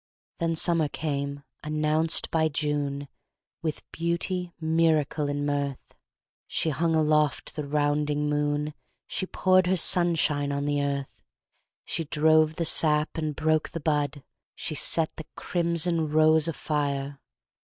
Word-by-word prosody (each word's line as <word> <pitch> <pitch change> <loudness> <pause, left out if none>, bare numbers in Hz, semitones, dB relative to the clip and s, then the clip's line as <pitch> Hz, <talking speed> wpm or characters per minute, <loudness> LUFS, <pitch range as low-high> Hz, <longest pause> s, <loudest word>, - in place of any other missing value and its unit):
Then 165 -1 0
summer 165 -1 +2
came, 140 -2 -4 0.2
announced 155 +1 +1
by 160 -1 +2
June, 145 -1 -2 0.5
With 155 -2 -3
beauty, 170 +2 -2
miracle 160 -2 +1
and 145 0 -2
mirth. 140 -2 -3 0.5
She 160 - -1
hung 160 +3 0
aloft 150 -1 +1
the 150 -2 -4
rounding 150 0 0
moon, 150 0 -1 0.3
She 190 - -3
poured 185 -1 +3
her 185 +1 +2
sunshine 160 -5 +3
on 140 0 -2
the 145 0 0
earth, 140 -1 -4 0.6
She 165 - -2
drove 155 +1 +3
the 170 - -2
sap 150 -1 +2
and 155 -2 -3
broke 155 0 +1
the 165 - -5
bud, 145 -2 -1 0.3
She - - -3
set 155 +2 +1
the 160 - -8
crimson 170 -2 0
rose 155 0 +4
afire. 140 -3 -2
155 Hz, 130 wpm, -26 LUFS, 145-160 Hz, 0.6 s, rose